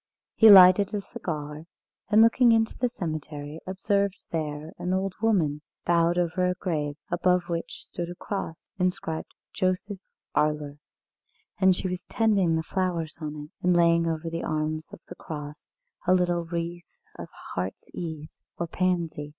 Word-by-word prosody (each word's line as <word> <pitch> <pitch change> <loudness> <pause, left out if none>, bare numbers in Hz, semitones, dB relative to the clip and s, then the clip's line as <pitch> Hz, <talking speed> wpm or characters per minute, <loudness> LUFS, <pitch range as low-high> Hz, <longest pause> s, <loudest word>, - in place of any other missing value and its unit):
He 225 - +7
lighted 195 +1 +8
a - - 0
cigar, 150 -4 -6 0.4
and, 215 +2 +7
looking 235 +1 +5
into 225 -1 +2
the 250 - 0
cemetery, 155 -5 -5
observed 200 +1 -1
there 155 -1 -4
an 180 +1 -1
old 190 0 -1
woman, 165 -10 +2 0.2
bowed 170 0 +3
over 180 +1 +1
a 180 - 0
grave, 150 -6 -2 0.2
above 180 0 +2
which 170 -1 -4
stood 175 -1 -5
a 175 - -7
cross, 175 -4 -6
inscribed 180 -3 -2 0.2
"Joseph 185 +2 -1 0.4
Arler," 150 -1 0 0.8
and 190 -1 +5
she 185 - -2
was 180 0 -4
tending 200 -7 +2
the 160 - -1
flowers 175 -3 -2
on 155 -1 -4
it, 150 0 -8
and 180 -1 +4
laying 170 -1 +4
over 165 0 -2
the 165 0 -3
arms 155 0 -2
of - - -11
the - - -8
cross 150 -1 -8 0.4
a 185 - +6
little 175 -1 +1
wreath 170 0 -5 0.2
of - - -7 0.2
heart's 90 +1 -4
ease 160 -3 -7 0.2
or 170 - -1
pansy. 170 -4 -1
170 Hz, 155 wpm, -26 LUFS, 155-185 Hz, 0.8 s, lighted